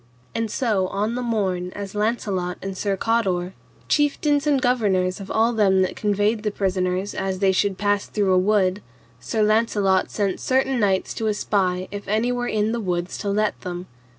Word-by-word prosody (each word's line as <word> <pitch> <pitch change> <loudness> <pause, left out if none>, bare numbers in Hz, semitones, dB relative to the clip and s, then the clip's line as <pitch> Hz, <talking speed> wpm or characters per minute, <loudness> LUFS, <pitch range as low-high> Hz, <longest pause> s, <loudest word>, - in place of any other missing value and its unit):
And 225 -1 -1
so 210 -5 0
on 210 +4 -1
the 250 - -2
morn 190 -6 -1
as 200 -1 -6
Launcelot 205 -4 -1
and 195 0 -4
Sir 195 0 -1
Cador, 190 -5 0 0.3
chieftains 295 0 +2
and 285 -2 +3
governors 205 -8 +1
of 195 - -8
all 230 +2 +2
them 190 -4 +3
that 185 - -2
conveyed 210 +1 +1
the 215 - 0
prisoners, 190 -1 -1
as 190 0 -2
they 190 0 +3
should 190 0 +1
pass 205 -1 0
through 200 -3 +1
a - - +4
wood, 195 0 +2 0.4
Sir 220 -2 -1
Launcelot 210 -3 +2
sent 200 -3 -1
certain 265 0 +1
knights 195 -3 +1
to 220 - -2
espy 185 -3 0
if 205 0 -7
any 220 +4 +1
were 245 0 -2
in 215 0 0
the 235 - -1
woods 180 -2 -2
to 205 - -2
let 210 +1 0
them. 180 -1 -5
205 Hz, 180 wpm, -23 LUFS, 190-225 Hz, 0.4 s, a